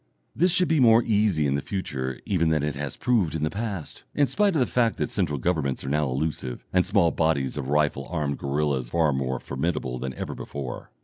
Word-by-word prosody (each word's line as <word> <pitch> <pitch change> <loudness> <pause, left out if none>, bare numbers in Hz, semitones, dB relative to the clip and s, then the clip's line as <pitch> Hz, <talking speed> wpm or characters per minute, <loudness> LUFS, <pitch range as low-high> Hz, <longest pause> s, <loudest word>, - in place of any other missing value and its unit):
This 180 +2 +3
should 180 +1 +3
be 160 -1 +2
more 115 -2 +6
easy 105 -8 +2
in 70 - +1
the 70 - 0
future 65 -10 -4
even 85 -4 +1
than 80 -2 +1
it 75 -1 -1
has 70 -1 -5
proved 100 - +1
in 80 - -2
the 75 - 0
past, 100 -6 -5
in 145 - +4
spite 200 - +1
of - - +3
the 125 - +4
fact 120 -3 +1
that - - -2
central 85 -8 0
governments 70 -2 -1
are 65 - -4
now 75 0 +1
elusive, 65 -2 -3
and 90 -1 +3
small 85 -1 +3
bodies 80 -5 0
of 70 -3 -4
rifle 75 -2 +1
armed 75 -5 -2
guerillas 70 -3 -1
far 80 0 +2
more 65 -1 -1
formidable 70 -3 -2
than 65 0 -4
ever - - -4
before. 70 -3 -6
75 Hz, 215 wpm, -25 LUFS, 70-100 Hz, -, more